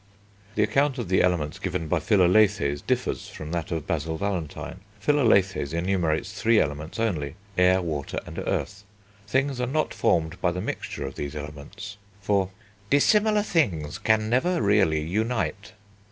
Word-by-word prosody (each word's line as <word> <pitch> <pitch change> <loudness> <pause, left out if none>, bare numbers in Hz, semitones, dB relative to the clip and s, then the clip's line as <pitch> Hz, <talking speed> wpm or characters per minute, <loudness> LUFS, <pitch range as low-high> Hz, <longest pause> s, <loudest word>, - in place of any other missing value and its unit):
The - - +3
account 135 +6 +2
of 115 -7 -4
the 95 - +4
Elements 85 -5 0
given 80 - -3
by - - +1
Philalethes 95 -7 +3
differs - - -2
from 75 0 -8
that 85 -2 -2
of 80 -4 -3
Basil 80 +1 -2
Valentine. 95 -3 -4 0.2
Philalethes 100 - +2
enumerates 85 0 0
three 115 -1 +4
Elements 75 +6 -2
only: 80 -11 -1 0.2
Air, 90 0 +4
Water, 75 -5 -3
and - - -7
Earth. 100 0 -3 0.4
Things 130 +2 0
are 125 - 0
not 155 +5 0
formed 80 +1 0
by 90 - +2
the 90 - -3
mixture - - -4
of - - -5
these 70 +1 -5
Elements, 75 +9 -8 0.2
for 100 -2 +1 0.4
"dissimilar 210 - +4
things 95 - 0
can 110 -1 +2
never 160 +10 +2
really 100 -7 +3
unite." 100 +2 -2
95 Hz, 150 wpm, -25 LUFS, 80-110 Hz, 0.4 s, the